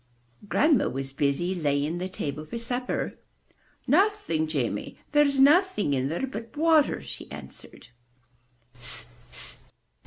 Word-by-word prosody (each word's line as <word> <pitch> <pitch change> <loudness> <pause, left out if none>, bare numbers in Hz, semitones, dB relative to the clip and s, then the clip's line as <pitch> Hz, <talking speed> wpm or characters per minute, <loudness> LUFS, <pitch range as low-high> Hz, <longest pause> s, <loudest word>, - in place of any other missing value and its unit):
*' 120 - -22
Grandma 295 -5 +3
was 135 0 -5
busy 145 +6 0
laying 150 0 -1
the 185 +1 -4
table 150 -4 -5
for 230 +9 -7
supper. 245 +2 -3 0.7
Nothing, 305 - +1
Jamie! 125 -9 -3
There's 295 -2 +3
nothing 290 - +4
in 135 0 -1
there 170 - -2
but 230 -1 -9
water, 315 -2 +3
she - - -10
answered. 75 - -12
185 Hz, 115 wpm, -26 LUFS, -, 0.7 s, nothing